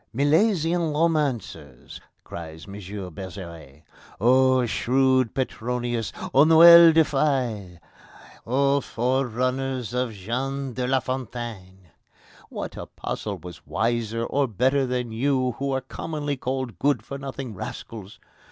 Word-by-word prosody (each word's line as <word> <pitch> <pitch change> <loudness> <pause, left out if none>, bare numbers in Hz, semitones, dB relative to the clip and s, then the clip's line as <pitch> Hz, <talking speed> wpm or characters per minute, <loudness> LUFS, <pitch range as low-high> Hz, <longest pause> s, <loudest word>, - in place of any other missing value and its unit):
"Milesian 165 - +2
romancers!" 150 -6 -2 0.2
cried 80 -1 -9
M. 100 - -10 0.4
Bergeret. 85 -5 -9 0.4
"O 130 +3 +4
shrewd 130 +1 +1
Petronius! 120 -2 -2 0.2
O 135 - +7
Noël 170 +1 +9
du 160 0 +5
Fail! 125 - -1 0.7
O 140 +3 +2
forerunners 130 0 -1
of 125 -1 -1
Jean 130 +6 -4
de 125 +1 -2
la 130 0 +2
Fontaine! 115 -8 -6 0.6
What - - -6
apostle - - -5
was 90 -1 -11
wiser 115 +1 -1
or 140 +2 0
better 130 +5 +1
than 125 -2 -2
you, 130 +2 0
who 140 0 -1
are 135 0 -1
commonly 145 +2 -4
called 130 -6 -4
good 145 0 +1
for 140 - -7
nothing 135 -3 -6
rascals? 105 +1 -8
130 Hz, 115 wpm, -24 LUFS, 115-140 Hz, 0.7 s, Noël